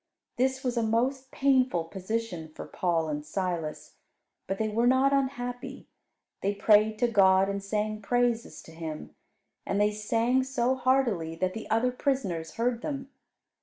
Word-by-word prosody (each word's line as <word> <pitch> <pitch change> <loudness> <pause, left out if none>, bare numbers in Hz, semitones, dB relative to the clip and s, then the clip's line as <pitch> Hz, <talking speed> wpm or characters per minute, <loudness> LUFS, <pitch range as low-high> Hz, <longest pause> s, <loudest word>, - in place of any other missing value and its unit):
This 260 +1 +1
was 250 -2 -1
a - - +3
most 255 +4 0
painful 260 -11 +2
position 185 -1 -4
for - - -7
Paul 170 -3 0
and 150 -1 -3
Silas. 165 -1 -4 0.5
But 195 - -2
they 220 - 0
were 230 +3 +1
not 260 +2 +4
unhappy. 245 -2 -2 0.6
They 200 +1 0
prayed 215 +1 +4
to 245 - +2
God, 195 -3 +5
and 200 0 -3
sang 215 +1 -2
praises 240 +1 0
to - - -14
Him; 160 -1 -7 0.5
and 200 - -1
they 210 0 +3
sang 230 +4 +1
so 260 -1 0
heartily 250 -11 +1
that 185 +2 -1
the 220 -1 -7
other 225 +3 +2
prisoners 205 - -2
heard 235 0 0
them. 275 -2 -5
225 Hz, 155 wpm, -28 LUFS, 190-250 Hz, 0.6 s, God